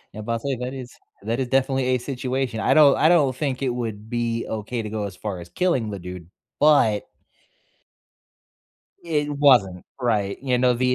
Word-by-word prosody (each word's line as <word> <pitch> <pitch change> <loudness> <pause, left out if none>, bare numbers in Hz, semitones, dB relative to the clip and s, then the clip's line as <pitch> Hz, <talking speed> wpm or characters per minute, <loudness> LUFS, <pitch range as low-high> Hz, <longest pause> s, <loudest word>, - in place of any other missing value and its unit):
Yeah, 110 - -6
but 115 +2 -3
I - - -1
say 135 +3 -3
that 125 +2 -5
is 125 -2 -8 0.3
that 115 +4 -2
is 130 - -1
definitely 135 0 +1
a 130 0 +2
situation, 130 -2 -3
I - - +2
don't 145 -3 +7
I 155 - +4
don't 145 -7 +3
think 135 -2 -2
it 130 - +1
would 110 -3 -5
be 115 -1 -1
okay 110 +2 -4
to 105 - -5
go 105 -2 -2
as 95 -2 -7
far 100 -4 -5
as 85 0 -10
killing 130 - 0
the 100 - -5
dude, 90 -2 -9 0.3
but 130 -9 +4 2.0
It 150 -3 -1
wasn't, 125 -11 +3 0.2
right. 105 -5 0
You 125 -2 +1
know, 125 0 +4
the 125 +1 +1
125 Hz, 190 wpm, -23 LUFS, 110-135 Hz, 2.0 s, don't